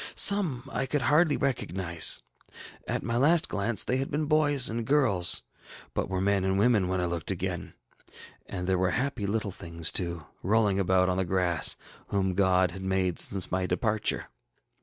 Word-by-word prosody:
Some 165 - +3
I 135 - -1
could 145 0 -1
hardly 150 +3 +3
recognize; 95 - +1 0.6
at - - -2
my 115 0 -2
last 160 +6 +3
glance 105 +1 0
they 125 - -1
had 135 +1 -2
been 150 +2 -1
boys 145 -3 +3
and 115 +1 -2
girls, 120 -10 +2 0.5
but - - -2
were 95 - -2
young 95 - -1
men 100 -1 +1
and 95 0 0
women 105 -3 +3
when 95 0 -1
I 90 - 0
looked 85 -1 -3
again; 95 -2 -4 0.7
and 90 -2 -5
there 95 0 0
were 95 0 +1
happy 125 -5 -2
little 105 0 -2
things 85 -2 -3
too, 85 -4 -2 0.2
rolling 105 0 +1
about 95 -1 +2
on 90 0 0
the 95 - +1
grass, 90 -2 +2 0.3
whom 95 -2 -1
God 95 -1 +2
had 95 +2 -9
made 95 -2 -1
since 95 -3 +1
my 90 0 -1
departure. 105 +4 -1
95 Hz, 180 wpm, -27 LUFS, 90-125 Hz, 0.7 s, Some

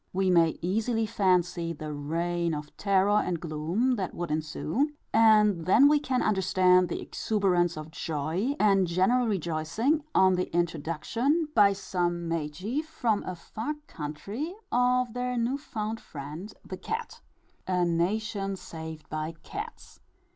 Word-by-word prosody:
We 190 0 +2
may 165 -2 +4
easily 225 +5 0
fancy, 180 -5 +1
the 155 -1 -6
reign 170 +3 -1
of 150 0 -8
terror 200 +1 +3
and 175 -2 -2
gloom 170 +11 0
that 185 -3 -3
would 175 -2 -4
ensue; 160 - -1 0.2
and 210 -6 +5
then 260 +9 +7
we 295 0 +4
can 260 -3 0
understand 185 -3 +3
the - - -3
exuberance 180 -6 0
of 155 +1 -7
joy, 165 - -2
and 195 -3 +4
general 190 +9 +2
rejoicing 195 - 0
on 190 0 +6
the 180 0 -1
introduction, 175 - 0
by 205 -5 +6
some 175 -3 -2
Magi 165 - -2
from 245 -10 -1
a 185 - -4
far 220 - -5
country, 200 - -5 0.2
of 250 -1 +2
their 250 0 -2
new 240 +4 0
found 220 -5 -4
friend 155 +7 -8
the 185 - -6
cat. 450 - -5 0.5
_A 180 -1 +2
nation 195 +3 -1
saved 160 -3 -8
by 155 +1 -4
cats! 430 +3 -8
185 Hz, 140 wpm, -28 LUFS, 165-225 Hz, 0.5 s, then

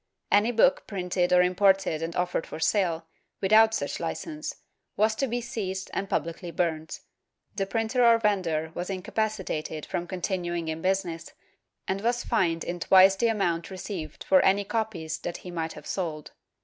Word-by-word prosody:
Any 210 +4 +4
book 255 +4 +3
printed 180 -2 -1
or 180 0 +6
imported 190 -2 +2
and 165 +1 -4
offered 180 -2 -1
for 155 - -7
sale, 170 -3 +1 0.3
without 220 +3 +5
such - - -3
hcence, 310 -1 -4 0.4
was 215 +1 +3
to 270 +5 -1
be 240 0 -2
seized 195 -5 -4
and 195 - -2
pubhcly 170 0 -3
burnt; 160 -3 -2 0.5
the 195 -1 -1
printer 225 +4 +1
or 235 -1 +7
vendor 180 -8 0
was 175 +2 -4
incapacitated 190 -6 -3
from 175 - -3
continuing 175 -2 -2
in 160 0 -4
business 185 -3 -1 0.5
and 190 +1 -1
was 240 +2 0
fined 165 -5 +1
in 175 0 -4
twice 190 +2 +6
the 230 +4 +1
amount 175 -7 0
received 185 -3 -6
for 190 - +5
any 200 +1 +3
copies 195 -8 -3
that 175 - -5
he 180 - -6
might 165 -1 -3
have - - -11
sold. 160 -5 -4
190 Hz, 160 wpm, -27 LUFS, 170-215 Hz, 0.5 s, or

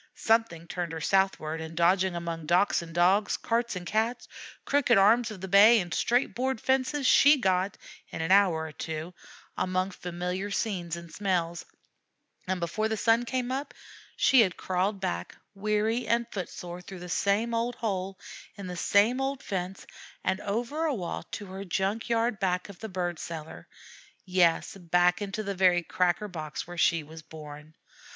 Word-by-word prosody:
Something 225 -7 +1
turned 175 -1 -4
her 160 - -4
southward; 165 -3 +1
and, 160 0 -8
dodging 180 +1 +3
among 165 -2 -5
docks 175 +4 +3
and 170 -1 -9
Dogs, 185 +5 +3
carts 235 -1 -1
and 180 -1 -6
Cats, 225 +6 -1 0.4
crooked 275 -5 +3
arms 225 +5 +5
of 210 -4 -9
the 190 - -5
bay 205 +5 +7
and 175 -4 -4
straight 245 +3 +1
board 260 -1 -1
fences, 265 +3 0
she 285 +3 +7
got, 190 -4 0 0.3
in - - -7
an 160 +2 -1
hour 185 -5 +4
or 160 - -7
two, 160 +3 -6 0.4
among 185 +1 -1
familiar 180 +2 -4
scenes 185 -5 -2
and 170 -1 -10
smells; 175 -4 -1 0.8
and, 185 0 -1
before 190 +6 -1
the 220 - -1
sun 230 +2 +3
came 255 0 -2
up, 275 +3 -4 0.4
she 265 - +5
had 185 -5 +1
crawled 190 +2 -1
back 85 - -3 0.2
weary 215 +4 0
and 235 0 +2
foot 190 -4 -4
sore 175 0 -8
through 190 +1 -10
the 180 - -7
same 205 +6 +1
old 235 +1 -1
hole 195 -3 -3 0.4
in 200 -2 -8
the 180 -1 -5
same 215 +9 +3
old 270 0 -2
fence 190 -1 -4 0.4
and 190 +1 0
over 240 +11 -2
a 300 -4 0
wall 180 -6 -4
to 205 - -6
her 190 +1 -7
junk 195 +5 -2
yard 230 -2 +1
back 180 0 -1
of 195 - -11
the 220 - -6
bird 175 -3 -3
cellar 160 -1 -8 0.6
yes, 180 -2 +2
back 175 +1 +2
into 205 +1 -3
the 200 -1 -3
very 180 -2 +3
cracker 180 +4 0
box 155 -5 -6
where 175 - -9
she 170 -1 +2
was 160 +2 -11
born. 155 -1 -11
190 Hz, 175 wpm, -28 LUFS, 175-220 Hz, 0.8 s, bay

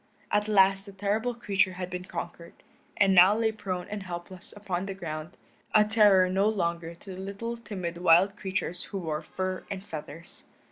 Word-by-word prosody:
At 210 0 +2
last 195 -1 +4
the 200 - -10
terrible 210 +5 -1
creature 200 -5 +1
had 180 0 -6
been 180 0 -5
conquered, 170 -1 -7 0.4
and 195 -1 +4
now 190 +3 +7
lay 225 -1 +2
prone 190 -4 -4
and 210 -1 -5
helpless 180 0 -8
upon 195 -2 -3
the 195 - -4
ground, 155 -3 -6 0.4
a 210 0 +7
terror 205 -4 +5
no 195 +3 +2
longer 170 -4 -2
to 190 +3 -10
the 185 - -7
little 200 +5 -5
timid 185 -7 -6
wild 180 +3 +5
creatures 185 -3 -3
who 200 - -6
wore 160 -4 -3
fur 185 +3 -4
and 190 -1 -5
feathers. 165 0 -9
190 Hz, 180 wpm, -28 LUFS, 175-205 Hz, 0.4 s, now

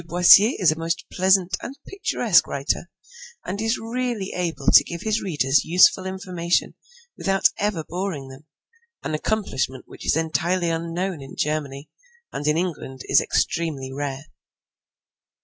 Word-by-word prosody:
Boissier 180 - +6
is 180 -5 +4
a 155 - -4
most 165 +1 -2
pleasant 185 0 +3
and 270 - -7
picturesque 400 +3 +2
writer, - - -2 0.6
and 200 +3 -4
is 225 +2 0
really 230 -3 -3
able 165 -6 -3
to - - +8
give 170 -1 -7
his 220 0 0
readers 145 -6 +1
useful 180 +2 +4
information 180 -2 -2 0.4
without 195 0 +2
ever 200 -6 -1
boring 175 -6 -4
them, 135 +3 -14 0.6
an - - -3
accomplishment 155 -8 -2
which - - -12
is - - +1
entirely 170 +2 0
unknown 170 +1 -3
in 135 - -10
Germany, 145 -2 -3 0.4
and 145 - -4
in 150 +1 +2
England 155 -7 -4
is - - +5
extremely 140 -6 -2
rare. 135 0 -4
170 Hz, 140 wpm, -23 LUFS, 150-190 Hz, 0.6 s, to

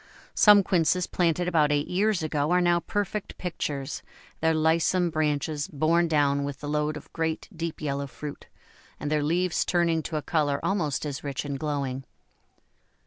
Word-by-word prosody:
Some 205 -2 +7
Quinces 180 -1 +2
planted 175 0 0
about 155 -4 +3
eight 145 0 +1
years 195 -1 +1
ago 150 -1 0
are 180 +1 +4
now 175 -1 +3
perfect 205 +2 -3
pictures, 145 -5 -4 0.4
their 160 0 +2
lissome 165 +3 +2
branches 150 0 -1
borne 170 +1 +2
down 145 -3 +2
with 140 0 -5
the 145 - -6
load 150 +1 -1
of 150 - -13
great, 160 -1 -2
deep 165 0 -4
yellow 140 -1 -2
fruit, 145 +3 -8 0.5
and 145 +1 -3
their 150 -1 +2
leaves 170 +4 +1
turning 170 -2 +1
to 155 0 -4
a 150 - -3
colour 145 -3 +1
almost 155 -8 0
as 145 -2 -5
rich 140 -1 -4
and 140 -1 -4
glowing. 140 -3 -2
155 Hz, 165 wpm, -26 LUFS, 145-175 Hz, 0.5 s, Some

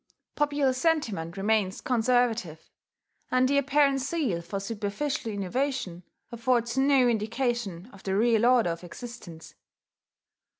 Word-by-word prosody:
Popular 290 -3 +1
sentiment 235 - -1
remains 200 -1 +1
conservative; 235 -8 0 0.6
and 255 0 +3
the 280 +1 +3
apparent 280 0 +2
zeal 265 - -1
for 175 +4 -5
superficial 225 +6 -3
innovation 200 -2 -2 0.3
affords 235 0 0
no 265 -1 +4
indication 230 -4 -1
of 195 - -14
the 190 -1 -2
real 230 0 +3
order 245 -8 +4
of 165 +1 -6
existence. 175 -4 -10
235 Hz, 115 wpm, -27 LUFS, 195-265 Hz, 0.6 s, no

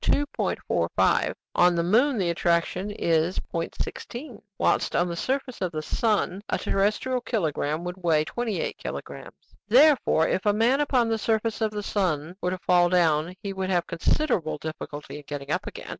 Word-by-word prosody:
45; - - 0 0.2
on 175 0 +4
the 170 - +1
moon 240 +9 +3
the 180 -4 +1
attraction 170 +3 0
is 170 -3 0 0.2
0.16, 235 - -5 0.2
whilst - - +1
on 175 - +2
the 170 - -3
surface 260 +5 -3
of 185 -2 -1
the 155 -1 -4
sun 210 -1 0
a - - +1
terrestrial 215 +6 0
kilogramme 160 - -1
would 180 +1 -6
weigh 160 -3 +2
28 230 +2 -3
kilogrammes." - - -8
"Therefore, 255 - +5
if 185 - 0
a 205 - +5
man 235 +6 +3
upon 255 -5 +2
the 225 -1 0
surface 225 +1 0
of 220 - +2
the 210 -1 -5
sun 175 -5 -1
were 180 - 0
to 185 - -2
fall 175 -1 +3
down, 170 -1 +2
he 200 -1 -3
would 190 -1 -3
have 175 -2 +1
considerable 170 - 0
difficulty 150 -1 -7
in 150 - -10
getting 145 -1 -5
up - - -1
again. - - -8
185 Hz, 170 wpm, -26 LUFS, 170-225 Hz, 0.2 s, Therefore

